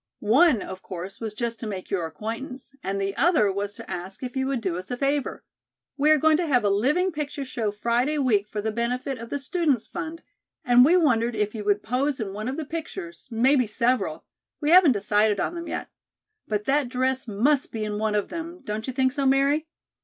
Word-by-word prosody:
"One 275 -6 +5
of 185 0 -8
course 185 +1 -7
was 220 -2 -5
just 235 0 -3
to 225 - -5
make 190 -3 -6
your 175 -4 0
acquaintance, 230 - -6
and 195 +1 -2
the 195 0 -2
other 310 - +4
was 205 +1 -3
to - - -10
ask 185 +6 -6
if 250 0 -5
you 265 0 0
would 270 -2 0
do 190 -6 -2
us 185 +2 -6
a 245 - -3
favor. 280 +1 -1 0.5
We 295 +2 +2
are 310 - +7
going 315 +1 +4
to 340 0 -1
have 250 -6 +3
a 205 - +3
living 295 - +2
picture 295 -2 -4
show 235 -4 -2
Friday 235 +8 0
week 220 -8 +2
for 210 - -3
the 220 +1 -1
benefit 245 +3 -2
of 230 0 -8
the - - -2
Students' 285 -3 0
Fund, 325 +2 -6 0.4
and 245 0 +7
we 335 +7 +5
wondered 240 -8 +2
if 210 -1 -1
you 215 -2 -5
would 205 0 +2
pose 260 +4 0
in 200 -4 -4
one 215 +2 -4
of 265 - -3
the 315 - -3
pictures, 340 +3 -7
maybe 250 +2 +3
several, 220 -6 0 0.3
we 300 +1 +1
haven't 350 -6 +8
decided 210 0 +2
on - - -1
them 340 0 -6
yet. - - -4 0.6
But 210 -1 -2
that 275 -1 +1
dress 260 0 -1
must 260 +7 +1
be 220 -1 -3
in 210 0 -3
one 215 -1 0
of 205 - 0
them, 335 +1 -6
don't 215 +2 -4
you 260 - -3
think 260 0 +2
so, 275 0 0
Mary? 280 +4 +2
245 Hz, 220 wpm, -25 LUFS, 210-285 Hz, 0.6 s, haven't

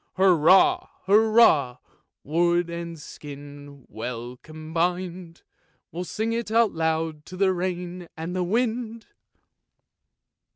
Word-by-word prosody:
Hurrah! 185 -1 +4 0.2
hurrah! 205 - +4 0.5
wood 170 +2 +1
and 170 -1 -6
skin 145 -2 -11
well 120 +1 -6
combin'd, 170 +2 -4 0.5
We'll 175 +2 -5
sing 220 +5 -2
it 230 -1 -3
aloud 160 -8 0
to 185 - -9
the 190 -1 +3
rain 180 -1 -4
and 165 +3 -5
the 185 - 0
wind! 230 +3 -2
175 Hz, 95 wpm, -25 LUFS, 155-190 Hz, 0.5 s, Hurrah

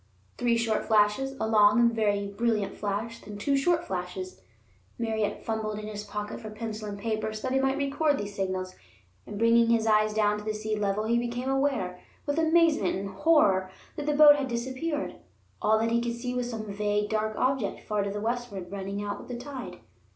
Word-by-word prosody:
Three 240 -1 +2
short 230 -2 0
flashes, 220 +5 +2
a - - 0
long 210 0 +5
and 235 -1 +4
very 205 -2 +1
brilliant 210 0 -1
flash, 215 +3 -3
then 210 0 -9
two 275 +7 +1
short 340 +5 +2
flashes. 185 0 -5 0.6
Merritt 220 -2 -2
fumbled 220 -1 -2
in 210 - -6
his 210 -1 -6
pocket 210 0 -5
for 215 - -7
pencil 215 -1 -5
and 200 - -6
paper 215 +1 -2
so 215 - -7
that 255 - -1
he 265 - +3
might 270 0 +1
record 285 +1 +1
these 205 0 -5
signals, 185 -1 -2 0.5
and, 205 - -6
bringing 230 +1 +4
his 230 -1 +3
eyes 215 -1 +3
down 210 -1 +1
to - - -9
the 215 0 -2
sea 215 0 -2
level, 205 0 0
he 235 +2 +2
became 240 +2 -3
aware, 265 -10 0 0.3
with 290 +2 0
amazement 320 - +3
and 195 +1 -4
horror, 195 - +3 0.3
that 295 -1 -5
the 295 - +2
boat 295 -1 +8
had 275 -2 -2
disappeared. 260 +6 -3 0.4
All 220 +1 +4
that 225 +1 0
he 235 0 +2
could 235 0 -2
see 245 +1 -4
was 250 -1 -2
some 220 -2 -5
vague, 210 0 0
dark 215 0 0
object 255 -6 0
far 210 -1 0
to 200 +1 -3
westward, 220 -5 -3
running 200 +1 -4
out 205 0 -4
with - - -11
the 245 - -5
tide. 260 0 -8
220 Hz, 200 wpm, -28 LUFS, 205-245 Hz, 0.6 s, boat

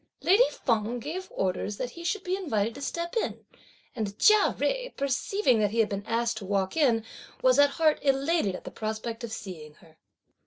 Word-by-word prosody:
Lady 435 +7 +5
Feng 230 0 -1
gave 345 +9 -5
orders 190 +2 -2
that 245 +2 -4
he 340 - -10
should 380 +3 -1
be 365 +1 -1
invited 230 - -1
to 280 - -10
step 340 +6 -4
in, - - -2 0.5
and 210 -3 -3
Chia 425 -1 +5
Jui - - -1
perceiving 275 - +1
that 210 -1 +2
he 225 - -5
had 225 -2 +3
been 200 0 -3
asked 230 0 0
to 205 - -6
walk 195 -1 -1
in 240 -8 +3 0.4
was 255 +1 +5
at 285 0 +7
heart 315 -2 +3
elated 275 - +1
at - - -9
the - - -8
prospect 220 +2 -4
of 235 - -5
seeing 165 -8 -8
her. 160 -2 -21
235 Hz, 195 wpm, -28 LUFS, 210-330 Hz, 0.5 s, at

